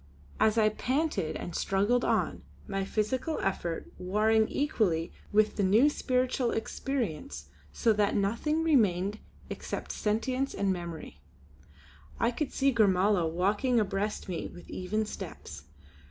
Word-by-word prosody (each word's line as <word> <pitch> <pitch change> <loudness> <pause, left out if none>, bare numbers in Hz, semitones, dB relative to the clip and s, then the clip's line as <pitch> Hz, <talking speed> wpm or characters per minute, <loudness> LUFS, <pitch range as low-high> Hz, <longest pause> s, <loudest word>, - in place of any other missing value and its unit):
As 220 +1 +3
I 215 -1 +5
panted 260 - -1
and 175 - -6
struggled 205 +6 +1
on, - - 0 0.3
my 195 -1 -1
physical 245 - -1
effort 175 -3 -2
warring 215 +4 +2
equally 200 - 0 0.2
with 215 +1 +3
the 205 - +1
new 220 +10 +5
spiritual 255 -2 0
experience 200 - -3 0.2
so 225 - +2
that 205 -1 +1
nothing 235 +11 0
remained 210 - +2 0.3
except - - -5
sentience 255 +6 -1
and 195 -1 +1
memory, 170 - -7 1.0
I 230 - +2
could 285 +3 -3
see 275 -1 +2
Gormala 195 -4 +3
walking 205 +8 +2
abreast 205 0 -2
me 180 -3 -3
with 175 - -13
even 215 +4 -1
steps. 70 - -8
215 Hz, 125 wpm, -29 LUFS, 190-245 Hz, 1.0 s, I